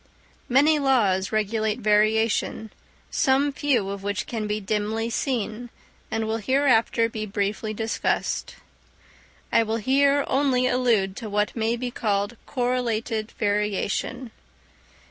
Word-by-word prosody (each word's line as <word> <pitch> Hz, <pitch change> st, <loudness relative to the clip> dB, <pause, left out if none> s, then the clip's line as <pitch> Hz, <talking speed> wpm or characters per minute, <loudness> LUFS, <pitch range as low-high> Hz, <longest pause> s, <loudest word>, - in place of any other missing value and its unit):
Many 295 Hz, +5 st, +4 dB
laws 210 Hz, -9 st, +2 dB
regulate 215 Hz, 0 st, 0 dB
variation, 220 Hz, 0 st, +1 dB, 0.4 s
some 275 Hz, +1 st, +2 dB
few 270 Hz, -8 st, 0 dB
of 200 Hz, 0 st, -5 dB
which 200 Hz, 0 st, -2 dB
can 220 Hz, -3 st, -4 dB
be 210 Hz, 0 st, -1 dB
dimly 215 Hz, +3 st, -2 dB
seen, 240 Hz, -2 st, -2 dB, 0.4 s
and 225 Hz, 0 st, -1 dB
will 220 Hz, +1 st, -1 dB
hereafter 235 Hz, -2 st, +2 dB
be 215 Hz, -1 st, -5 dB
briefly 205 Hz, +2 st, -2 dB
discussed. 225 Hz, +1 st, -2 dB, 1.0 s
I -, -, +5 dB
will 225 Hz, 0 st, -1 dB
here 275 Hz, +5 st, +3 dB
only 265 Hz, -2 st, +2 dB
allude 230 Hz, -7 st, +1 dB
to 225 Hz, -3 st, -6 dB
what 210 Hz, +1 st, 0 dB
may 225 Hz, 0 st, 0 dB
be 245 Hz, +1 st, -4 dB
called 205 Hz, 0 st, -1 dB
correlated 240 Hz, -3 st, -1 dB
variation. 210 Hz, +4 st, -1 dB
225 Hz, 120 wpm, -24 LUFS, 210-250 Hz, 1.0 s, I